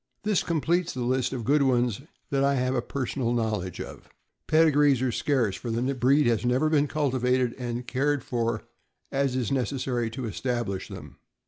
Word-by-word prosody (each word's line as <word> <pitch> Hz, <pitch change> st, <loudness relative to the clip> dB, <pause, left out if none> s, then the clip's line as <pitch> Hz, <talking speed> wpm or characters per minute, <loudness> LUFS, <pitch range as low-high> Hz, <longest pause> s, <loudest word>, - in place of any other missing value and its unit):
This 210 Hz, -3 st, +2 dB
completes 170 Hz, +1 st, 0 dB
the 125 Hz, -, -2 dB
list 130 Hz, +1 st, 0 dB
of 125 Hz, -3 st, -4 dB
good 145 Hz, +6 st, +3 dB
ones 125 Hz, -3 st, +2 dB, 0.3 s
that 135 Hz, -1 st, +2 dB
I 140 Hz, 0 st, +3 dB
have 130 Hz, 0 st, 0 dB
a 125 Hz, -, +1 dB
personal 125 Hz, -1 st, -2 dB
knowledge 105 Hz, -6 st, -2 dB
of. -, -, -8 dB, 0.4 s
Pedigrees 150 Hz, -4 st, +4 dB
are 130 Hz, -, +1 dB
scarce, 120 Hz, -6 st, +1 dB
for 120 Hz, -, -6 dB
the 120 Hz, +4 st, 0 dB
breed 135 Hz, +3 st, +3 dB
has 115 Hz, -2 st, +2 dB
never 130 Hz, +6 st, +2 dB
been 150 Hz, -2 st, +3 dB
cultivated 130 Hz, -4 st, +1 dB
and 120 Hz, 0 st, -4 dB
cared 140 Hz, +3 st, 0 dB
for 120 Hz, -4 st, -1 dB, 0.5 s
as 135 Hz, -2 st, 0 dB
is 125 Hz, -5 st, -1 dB
necessary 125 Hz, -2 st, -1 dB
to 125 Hz, +2 st, -5 dB
establish 115 Hz, -3 st, -2 dB
them. -, -, -10 dB
130 Hz, 175 wpm, -27 LUFS, 120-140 Hz, 0.5 s, Pedigrees